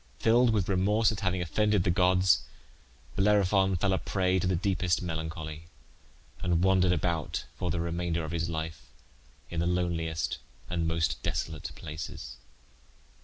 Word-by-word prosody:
Filled 120 +2 +4
with 105 -5 +1
remorse 105 +4 +3
at 105 - -4
having 95 -2 0
offended 105 +3 +2
the 90 - +2
gods 90 0 +4 0.7
Bellerophon 95 -1 +3
fell 95 +2 +1
a 95 - +1
prey 95 -1 +1
to 90 - 0
the 95 - +2
deepest 90 -2 0
melancholy, 80 -1 -5 0.8
and 85 -1 +1
wandered 95 -1 +4
about 85 -4 -1
for 90 +2 -3
the 85 +1 -1
remainder 85 0 -1
of 80 - -6
his 85 0 -1
life 80 0 -5 0.6
in 85 - -2
the 85 - +1
loneliest 80 -5 -1 0.3
and 85 -2 0
most 80 -3 0
desolate 80 -2 -3
places. 75 -4 -7
90 Hz, 145 wpm, -29 LUFS, 80-95 Hz, 0.8 s, Filled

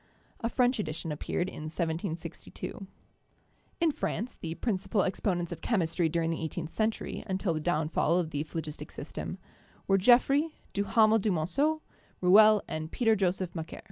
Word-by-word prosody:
A 230 - -1
French 245 0 +2
edition 160 -3 -3
appeared 155 +4 -2
in 155 -5 -7
1762. 165 +3 -4 0.9
In 335 -2 +3
France, 240 -4 -3
the 165 0 -6
principal 195 -2 0
exponents 180 -2 -1
of 170 - -6
chemistry 170 -6 +1
during 165 0 0
the 165 - -3
eighteenth 160 0 -4
century, 220 0 -2
until 190 -2 0
the 155 - -2
downfall 160 +1 +1
of 170 -3 -1
the 145 - -1
phlogistic 155 0 -6
system, - - -6 0.5
were 195 0 +3
Geoffroy, 255 - +5 0.3
Duhamel 215 +2 +4
du 215 - 0
Monceau, 280 - +1 0.4
Rouelle 210 +3 +7
and 155 0 -4
Peter 225 -3 +3
Joseph 185 -2 0
Macquer. 160 -2 -6
185 Hz, 145 wpm, -30 LUFS, 165-215 Hz, 0.9 s, Rouelle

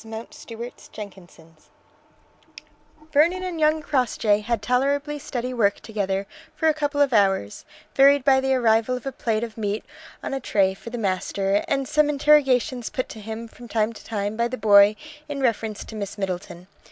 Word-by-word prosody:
MOUNTSTUART 230 +2 -9
JENKINSON'S 175 -6 -12 1.4
Vernon 340 +6 +3
and 360 -3 -4
young 310 0 +2
Crossjay 230 -7 +1
had 230 +1 -1
tolerably 280 +4 0
steady 255 -3 -4
work 205 -4 +2
together 200 -3 -2 0.3
for 320 - +1
a 315 - +5
couple 290 -1 -2
of 280 -3 +3
hours, 195 - +1 0.3
varied 280 0 +5
by 270 -1 +5
the 265 0 +1
arrival 230 0 +2
of 250 - -11
a 270 - -2
plate 225 -3 -1
of 225 -1 -7
meat 205 0 -2 0.4
on - - -4
a 270 - -1
tray 195 -6 +1
for 195 - -10
the 240 - -5
master, 195 -1 0
and 275 -1 0
some 300 +1 +2
interrogations 270 -4 +3
put 255 - -3
to 220 - -9
him 220 +2 -6
from 240 +1 -13
time 225 0 0
to - - -13
time 205 -1 -3
by 235 +1 +1
the 255 +2 -5
boy 205 -1 +6 0.3
in 285 -1 -4
reference 225 -5 -1
to 220 - -10
Miss 200 0 -5
Middleton. 180 -2 -5
230 Hz, 175 wpm, -24 LUFS, 205-275 Hz, 1.4 s, boy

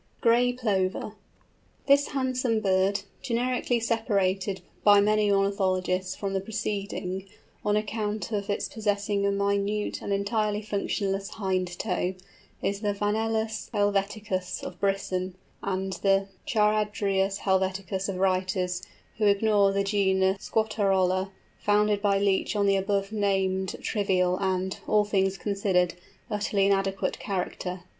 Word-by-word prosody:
GRAY 240 +1 +4
PLOVER. 205 -5 -1 0.7
This 280 0 +5
handsome 255 -4 0
bird, 195 0 +2 0.2
generically 245 -1 0
separated 200 -4 0 0.2
by 205 -1 +7
many 210 0 +3
ornithologists 185 -2 +1
from 195 -1 -3
the 195 - 0
preceding, 200 -3 -3 0.4
on 210 0 +2
account 210 -2 -2
of 205 -2 -2
its 205 - -1
possessing 205 -2 0
a - - +2
minute 200 +1 0
and - - -4
entirely 210 +1 0
functionless 200 -1 -2
hind 185 -4 -2
toe, 185 -2 -1 0.5
is 200 0 0
the 205 -1 -1
Vanellus 220 +1 -1
helveticus 200 -2 -1
of 180 - -7
Brisson, 190 -2 -1 0.3
and 190 0 -2
the 195 0 +3 0.2
Charadrius 205 -2 +1
helveticus 190 0 0
of 195 - -2
writers 185 -1 0 0.4
who 210 - +3
ignore 200 -1 +4
the 200 0 +1
genus 195 -1 +1
Squatarola, 195 -4 +1 0.3
founded 210 0 +2
by 200 -1 +3
Leach 200 +1 +1
on 205 -1 +2
the 195 0 +4
above 195 +1 0
named 190 -3 0
trivial 185 -3 +1
and, 190 -1 -1
all 210 -1 +3
things 195 -2 +1
considered, 195 -3 +1 0.4
utterly 205 -1 +1
inadequate 195 0 0
character. 180 -1 -3
200 Hz, 120 wpm, -27 LUFS, 190-210 Hz, 0.7 s, by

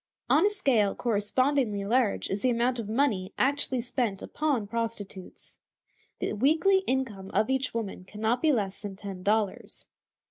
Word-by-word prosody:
On 310 - +5
a 410 - +5
scale 260 - +2
correspondingly 230 0 +1
large 230 0 +1
is 195 +1 -2
the 255 - +2
amount 240 +1 +1
of 215 -2 -5
money 220 -6 0
actually 270 -2 +1
spent 235 -5 -2
upon 285 -8 -1
prostitutes. 210 -4 -6 0.6
The - - -2
weekly 315 - +3
income 230 -8 -2
of 220 +5 +2
each 265 0 0
woman 200 -5 -4
can 210 +2 -11
not 225 +3 +1
be 315 - +4
less 200 -7 -1
than 200 -2 -6
ten 195 -2 -7
dollars. 210 0 -1
230 Hz, 155 wpm, -28 LUFS, 205-265 Hz, 0.6 s, On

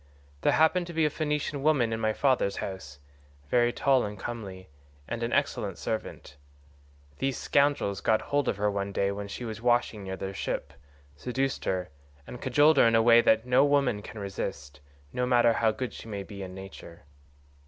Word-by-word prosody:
There - - +3
happened 170 +3 +3
to 170 - -7
be 160 -1 +3
a 150 - +1
Phoenician 150 -2 -2
woman 135 -6 +2
in 110 - -2
my 110 -1 +1
father's 130 -4 +1
house, 85 -7 -6 0.5
very 120 -1 +3
tall 135 0 +2
and 105 0 -5
comely, 95 -4 -7 0.4
and 120 - -4
an 115 +1 -2
excellent 105 -9 -1
servant; 110 -9 -5 0.8
these 135 -1 -1
scoundrels 140 -9 +1
got 110 -1 +2
hold 145 -2 0
of - - 0
her 105 0 +1
one 100 0 -3
day 100 0 0
when 100 0 -5
she 110 +5 -6
was 110 -1 -6
washing 120 -3 +1
near 95 0 -5
their 95 0 -5
ship, 75 -6 -4 0.4
seduced 130 - -2
her, 90 -1 -1 0.4
and 125 - -9
cajoled 145 +4 +4
her 115 - +6
in 115 0 +4
ways 120 0 +6
that 110 +1 +4
no 125 +2 +4
woman 140 -7 +2
can 110 - -10
resist, 75 -7 -5 0.3
no 125 0 -1
matter 120 -2 +4
how 115 -1 +2
good 120 +3 -4
she - - -10
may 100 -3 -5
be 100 0 -9
by 95 - -5
nature. 95 -3 -11
115 Hz, 185 wpm, -28 LUFS, 100-130 Hz, 0.8 s, her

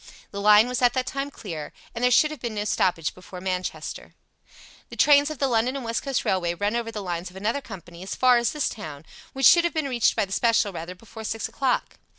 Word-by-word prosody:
The 200 - -5
line 210 +2 +6
was 250 0 -2
at 245 -1 +4
that 255 -1 -1
time 275 +2 -3
clear, 165 - -7 0.2
and 235 - -4
there 250 - +5
should 300 +5 +4
have 305 - -7
been 235 -3 -4
no 205 0 -2
stoppage 175 -6 0
before 180 0 -11
Manchester. 185 0 -4 0.7
The - - -9
trains 290 0 +5
of 310 - -6
the 275 - +1
London 245 +1 +1
and 270 -3 -5
West 230 0 -1
Coast 275 -3 -2
Railway 175 -2 0
run 205 +5 -1
over 235 -1 -2
the 210 -2 -5
lines 175 -1 -4
of 180 - -18
another 220 +8 -1
company 175 -7 -11
as 190 - -5
far 250 -1 +5
as 235 0 +1
this 300 -2 -1
town, 155 -8 -7 0.3
which 270 -1 0
should 340 +1 +8
have 345 -1 -1
been 310 -3 0
reached 245 -4 +2
by - - +1
the 190 - -16
special 225 -1 +2
rather 170 +2 -6
before 220 +3 -11
six 220 0 -3
o'clock. 265 -2 -1
225 Hz, 240 wpm, -25 LUFS, 185-255 Hz, 0.7 s, should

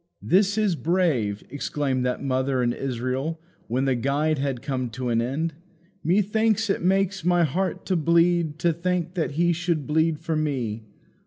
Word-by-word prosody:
"This 200 +3 +3
is 210 -5 +2
brave!" 150 - 0
exclaimed 140 -2 -1
that 125 - -2
mother 130 -1 0
in 120 0 +1
Israel, 130 +5 -3 0.3
when 130 +3 0
the 135 - +2
guide 140 +5 0
had 135 -3 -2
come 130 -3 -2
to 125 +2 -4
an 115 -1 +2
end. 150 +7 -2 0.5
"Methinks 210 +4 +2
it - - -1
makes 195 0 +1
my 175 0 +3
heart 185 +5 -1
to 185 - 0
bleed 170 -1 +2
to 170 +1 +2
think 175 +1 -1
that 165 -5 -2
He 170 +3 +2
should 170 -3 -1
bleed 160 +1 +2
for 160 +1 -3
me. 130 -8 -1
155 Hz, 165 wpm, -25 LUFS, 130-175 Hz, 0.5 s, This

